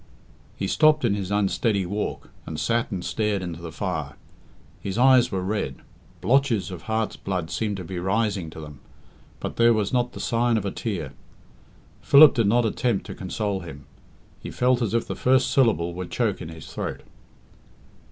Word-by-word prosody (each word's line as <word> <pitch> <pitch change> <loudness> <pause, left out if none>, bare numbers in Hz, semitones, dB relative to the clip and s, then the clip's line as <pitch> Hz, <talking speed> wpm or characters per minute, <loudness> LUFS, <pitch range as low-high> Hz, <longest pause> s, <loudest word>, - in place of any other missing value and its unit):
He - - -3
stopped 155 +6 +4
in 110 - +2
his 100 -2 -3
unsteady 100 0 +1
walk, 100 +4 -4 0.2
and 80 - -5
sat 115 +4 0
and 90 -3 -4
stared 105 -3 -1
into 85 -2 -6
the 85 -1 -7
fire. - - -4 0.6
His 95 +1 -4
eyes 130 0 +5
were 95 -2 -2
red; 95 -9 -2 0.5
blotches 115 -1 +2
of 90 -3 -7
heart's 110 +4 -2
blood 90 -4 -4
seemed 105 -3 -2
to 90 - -6
be 90 +1 -5
rising 95 -2 0
to 80 - -10
them; 75 -3 -10 0.6
but - - -5
there 115 0 +5
was 105 0 -1
not 125 -1 +1
the - - -8
sign 120 0 +1
of 105 - -3
a 100 - -1
tear. 100 -8 -4 0.9
Philip 145 0 +8
did 115 -4 +2
not 120 +3 +3
attempt 110 -1 0
to - - -7
console 100 +1 -3
him. 75 -5 -10 0.5
He - - -8
felt 125 0 +1
as 115 -1 0
if 115 - +1
the - - -4
first 130 0 +2
syllable 85 - +2
would 90 0 -6
choke 115 -5 -1
in 80 - -6
his 80 -1 -10
throat. - - -5
105 Hz, 180 wpm, -24 LUFS, 90-115 Hz, 0.9 s, Philip